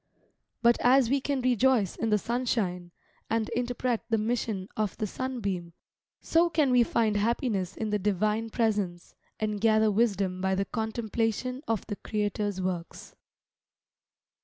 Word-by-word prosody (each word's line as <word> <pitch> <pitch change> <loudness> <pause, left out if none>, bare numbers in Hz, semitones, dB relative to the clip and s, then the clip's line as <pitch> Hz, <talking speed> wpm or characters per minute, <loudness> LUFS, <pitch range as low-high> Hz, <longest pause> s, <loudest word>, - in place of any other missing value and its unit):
But 235 0 +5
as 250 -1 +4
we 275 0 +2
can 275 -1 -1
rejoice 250 -5 +3
in 225 - -1
the 210 - +4
sunshine, 210 -7 -1 0.4
and 225 0 0
interpret 245 -1 -1
the 225 - +2
mission 215 -3 -2
of 215 -3 -2
the 215 - -1
sunbeam, 200 -8 -4 0.5
so 335 +1 +2
can 305 -5 +2
we 250 -1 +5
find 225 -2 +1
happiness 205 -3 0
in 220 -1 -2
the 210 - +1
Divine 210 +3 0
presence, 205 -7 -1 0.3
and 210 -1 -2
gather 220 -1 +4
wisdom 200 -4 +1
by 190 0 +1
the 195 +1 0
contemplation 225 +3 -2
of 225 -3 -1
the 205 - -5
Creator's 205 -2 -2
works. 180 -2 -4
220 Hz, 140 wpm, -28 LUFS, 200-240 Hz, 0.5 s, But